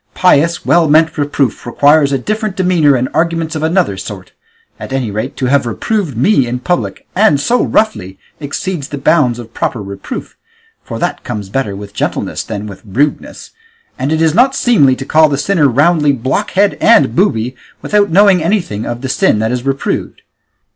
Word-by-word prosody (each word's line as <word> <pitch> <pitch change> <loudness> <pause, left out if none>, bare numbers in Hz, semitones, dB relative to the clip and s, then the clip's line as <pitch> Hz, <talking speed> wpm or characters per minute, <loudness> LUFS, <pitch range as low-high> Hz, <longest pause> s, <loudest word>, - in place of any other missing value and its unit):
Pious, 170 -2 +2
well 170 -2 +3
meant 160 +1 +3
reproof 145 -2 -1
requires 145 +4 +3
a 135 - +1
different 215 - -3
demeanour 175 -6 +3
and 125 0 0
arguments 165 -1 -1
of 155 - -3
another 160 - 0
sort; 95 -1 -8 0.5
at - - -8
any 130 -5 -2
rate, 105 +2 -4
to 130 - -2
have 130 -1 +1
reproved 170 - -2
me 135 - +2
in 120 +1 -2
public, 175 +8 -3
and 180 -8 +3
so 240 - +1
roughly, 105 - -1 0.2
exceeds 155 +1 -4
the 145 - -6
bounds 140 -5 +2
of 115 -1 -10
proper 120 - -2
reproof, 100 - -7 0.5
for - - -6
that - - -3
comes 100 -2 -6
better 105 -3 -2
with 100 0 -9
gentleness - - -3
than 105 -2 -6
with 100 -2 -10
rudeness; 135 +9 -3 0.5
and 135 +3 -1
it 160 0 +1
is 160 -2 +2
not 260 +7 +3
seemly 145 - +3
to 135 - -7
call 155 +1 +4
the 140 - -1
sinner 160 -1 +2
roundly 150 +3 +3
blockhead 135 - 0
and 230 0 +4
booby, 130 - 0 0.3
without 205 -1 +1
knowing 190 +1 +4
anything 165 - -2
of 120 0 -5
the 135 - -4
sin 125 -4 +1
that 110 +2 -1
is 125 +1 -3
reproved. 135 0 -3
145 Hz, 180 wpm, -14 LUFS, 120-175 Hz, 0.5 s, call